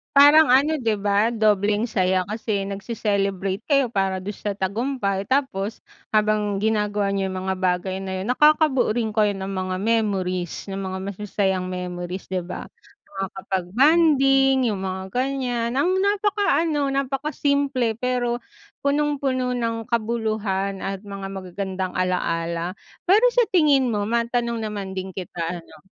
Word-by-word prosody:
Parang 290 +1 +8
ano 285 +5 +4
di 240 -7 0
ba? 205 +3 +2
Dobleng 210 0 +2
saya. 185 -4 +1
Kasi 210 -2 -2
nagce-celebrate 200 -1 -2
kayo 275 -3 +2
para 195 -4 -1
dun 195 +2 -6
sa 210 - -3
tagumpay, 200 +1 -1
tapos 225 -4 -1 0.3
habang 210 -2 +1
ginagawa 210 -2 0
niyo 195 -1 -1
yung 185 0 -5
mga 190 - 0
bagay 185 0 -1
na 190 0 -4
yun 190 - -4
nakakabuo 300 -1 +4
rin 220 -1 -2
kayo 210 -2 +3
ng 195 -1 -5
mga 185 -1 -3
memories 195 -5 -1
ng 195 0 -4
mga 190 0 -4
masasayang 195 -1 -1
memories 180 0 -5
di 185 -1 -2
ba? 180 - -7 0.4
Makakapag 190 -1 -4
bonding, 270 - +4
yung 200 -3 -2
mga 190 +1 -5
ganyan. 250 -3 -1
Ang 370 +5 +2
napakaano, 395 -8 +1
napaka 275 +2 -1
simple 280 -6 0
pero 245 0 -1 0.4
punong-puno 280 -3 0
ng 230 -2 -2
kabuluhan 215 -4 -1
at 195 0 -3
mga 195 -1 -6
magagandang 190 0 -4
ala-ala, 170 -1 -1 0.3
pero 435 +7 +5
sa 480 -2 +3
tingin 295 -8 +4
mo 210 -3 0
matanong 235 +1 0
naman 205 -3 -4
din 190 0 -6
kita 175 -2 -4
ano. 155 - -17
210 Hz, 140 wpm, -23 LUFS, 190-255 Hz, 0.4 s, Parang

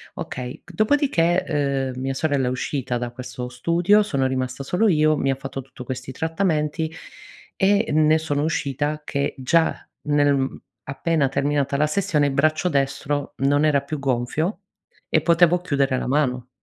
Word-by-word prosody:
okay. 125 -1 -6
Dopodiché, 165 - +1
uhm, 130 - -6
mia 135 0 -1
sorella 140 -2 0
è - - +1
uscita 130 -1 -2
da 120 0 -4
questo 125 0 -7
studio, 170 +11 +3
sono 140 -10 -1
rimasta 130 0 -3
solo 180 +10 +1
io, 155 -3 +3
mi 135 -2 0
ha - - 0
fatto 135 0 -6
tutto 130 -1 -11
questi 130 +1 -6
trattamenti 160 0 -1 0.6
e 205 +3 +3
ne 155 +1 +4
sono 145 -2 -1
uscita 150 -1 -1
che 140 0 -1
già 160 +6 +2 0.3
nel, 145 -1 +3
mhmm, 135 -1 -2 0.3
appena 145 +1 0
terminata 140 0 0
la 150 +2 +2
sessione, 170 -4 +1
il 140 - -2
braccio 155 +5 +2
destro 140 0 -1
non 145 +2 +2
era 145 -3 +3
più 150 +2 -5
gonfio 140 - -1 0.5
e 155 - +3
potevo 170 +2 +4
chiudere 140 -6 0
la - - -3
mano. 125 -3 0
145 Hz, 160 wpm, -23 LUFS, 135-160 Hz, 0.6 s, ne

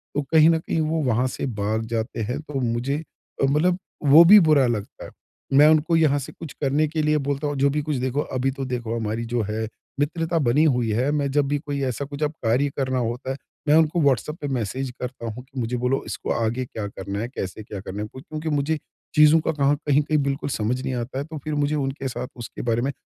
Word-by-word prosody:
तो 145 - +1
कहीं 160 0 +7
न 165 - +4
कहीं 160 - -2
वो 160 +1 0
वहाँ 125 0 +2
से 125 - -4
भाग 110 -2 -1
जाते 115 +1 -3
हैं 125 +6 -3
तो 150 -3 -5
मुझे 125 +5 -1 0.4
मतलब 155 +6 +3 0.3
वो 150 +4 +9
भी 210 +5 +10
बुरा 155 -6 +4
लगता 105 -4 -4
है। - - -11 0.5
मैं 150 +2 +8
उनको 155 +2 +3
यहाँ 155 -3 +4
से 135 - -7
कुछ 160 -4 -7
करने 145 +2 +2
के 155 +1 -2
लिए 150 0 +2
बोलता 140 +1 -2
हूँ 145 - -2
जो 140 +1 +3
भी 150 +2 0
कुछ 150 0 -2
देखो 130 +3 -1
अभी 130 -1 -1
तो 135 0 -5
देखो 120 -3 -3
हमारी 115 0 -2
जो 120 0 -1
है 110 +2 -3 0.3
मित्रता 165 +3 0
बनी 140 +2 +3
हुई 125 -7 +2
है। 125 +5 +1
मैं 145 -2 0
जब 145 0 +2
भी 145 +1 0
कोई 140 -1 -4
ऐसा 135 +2 -2
कुछ 145 +2 -5
अब 150 - +1
कार्य 125 +6 +2
करना 130 -2 0
होता 125 +3 -2
है 135 - -4 0.3
मैं 150 - +5
उनको 160 +1 +3
व्हाट्सएप 140 +1 +1
पे 145 - -2
मैसेज 130 0 -2
करता 125 -1 -5
हूँ 115 +2 -6
कि 130 0 -8
मुझे 120 +1 -1
बोलो 125 +2 0
इसको - - -4
आगे 120 +2 -1
क्या 110 -4 -5
करना 100 0 -5
है, 115 - -2
कैसे 110 -4 -6
क्या 100 -1 -7
करना 100 +2 -6
है? - - -5
क्योंकि 155 +4 -5
मुझे 150 +2 0 0.4
चीज़ों 150 +1 +7
का 160 - 0
कहाँ 145 -2 +2
कहीं-कहीं 150 +2 +3
बिल्कुल 140 +1 -2
समझ 125 +2 -1
नहीं 130 - -2
आता 125 +2 -4
है 140 - -2
तो 160 0 -8
फिर 155 - -3
मुझे 145 +1 +1
उनके 135 -1 -2
साथ 125 0 -4
उसके 120 -1 -7
बारे 120 0 +1
में 135 - 0
135 Hz, 235 wpm, -23 LUFS, 120-150 Hz, 0.5 s, भी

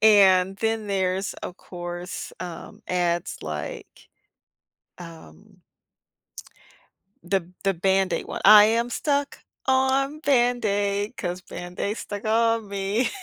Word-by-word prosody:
And 195 -3 +5
then 220 0 -1
there's, 190 -1 -1
of 180 - -8
course, 175 0 -7
um, 175 -2 -8
ads 175 -1 -1
like, 460 -5 -7 0.9
um 180 +3 -13 1.6
the 180 -1 -2
the 195 - +2
Band-Aid 190 +2 +1
one. - - -5
I 210 -1 +10
am 230 +2 +1
stuck 285 +2 -1 0.2
on 265 +2 +2
Band-Aid 220 -6 +1
'cause 180 -1 -4
Band-Aid's 180 +5 -5
stuck 205 0 -6
on 225 0 +2
me. 200 +5 0
200 Hz, 105 wpm, -24 LUFS, 185-230 Hz, 1.6 s, I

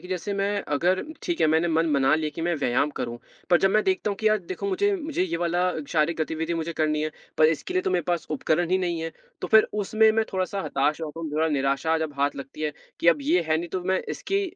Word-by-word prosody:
कि 180 - -12
जैसे 185 +2 -3
मैं 200 0 0
अगर 180 +5 +2 0.2
ठीक 345 -1 -2
है, - - +5
मैंने 165 +2 +2
मन 160 -1 +1
बना 135 0 +4
लिया 155 -1 -1
कि 165 - -4
मैं 175 0 +1
व्यायाम 140 +1 +1
करूँ, 120 -1 -4 0.3
पर 175 - +6
जब 195 - +4
मैं 215 +1 +3
देखता 190 +2 +1
हूँ 200 - -3
कि, 220 - -1
"यार 215 - +3
देखो, - - -3
मुझे 400 +1 +1
मुझे 310 - -2
ये 170 -2 -1
वाला 175 +1 +1 0.3
शारीरिक 160 +1 +2
गतिविधि 160 +2 -2
मुझे 165 +1 -3
करनी 155 -1 0
है, 155 - -1 0.3
पर 155 - +7
इसके 365 - -7
लिए 370 - +2
तो - - -1
मेरे 175 - 0
पास 175 -3 -1
उपकरण 160 +4 0
ही 185 - +3
नहीं 170 -2 -2
है।" 165 0 -3 0.3
तो - - -3
फिर 220 - +8 0.2
उसमें 220 +2 +4
मैं 220 - +3
थोड़ा-सा 190 +1 -1
हताश 145 +3 0
हो 160 - -3
जाता 160 +2 -8
हूँ, 160 -2 -4
थोड़ा 160 +2 +1
निराशा 140 +2 +1
जब 160 -2 -3
हाथ 145 0 +1
लगती 140 +2 -8
है 150 - -1 0.3
कि 170 - +4
अब 165 -3 +5
ये 170 +5 +2
है 155 - +3
नहीं, 170 +1 -4
तो 185 +2 -3
मैं 185 0 +1
इसकी 395 +1 -1
170 Hz, 265 wpm, -25 LUFS, 155-190 Hz, 0.3 s, फिर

